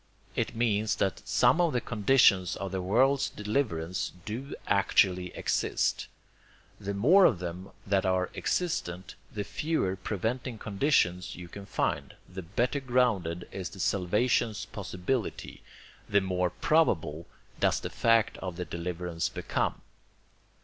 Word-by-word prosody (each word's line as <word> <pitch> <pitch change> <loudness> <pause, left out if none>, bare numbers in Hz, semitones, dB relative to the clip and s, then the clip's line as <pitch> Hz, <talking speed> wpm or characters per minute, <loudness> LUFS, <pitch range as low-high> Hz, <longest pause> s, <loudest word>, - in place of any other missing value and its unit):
It - - -1
means 110 -2 +1
that 95 - -1
some 175 - +4
of 170 -3 +2
the 125 - +2
conditions 105 -5 +3
of 95 -1 -5
the 95 -1 -2
world's 130 +9 +3
deliverance 90 - -2
do 125 +6 -5
actually 95 -2 +3
exist. - - 0 0.7
The 100 -1 -4
more 170 - +6
of 110 - +4
them 90 +2 -6 0.2
there 95 -1 +1
are 95 -1 +1
existent, 95 - -2 0.2
the 105 - -3
fewer 150 - -1
preventing 110 +6 -3
conditions 100 - +1
you 90 -1 -9
can 100 +2 -10
find, - - -2
the 95 +1 -7
better 120 - -1
grounded 115 -10 0
is 95 -2 -5
the 95 - -12
salvation's 105 +5 +1
possibility, 100 +4 -4 0.5
the 100 - +4
more 90 -2 0
PROBABLE 85 - +1 0.3
does - - +2
the - - -6
fact 115 -1 +3
of 90 -2 -5
the 90 0 -4
deliverance 85 0 -3
become. - - -2
100 Hz, 130 wpm, -29 LUFS, 90-120 Hz, 0.7 s, more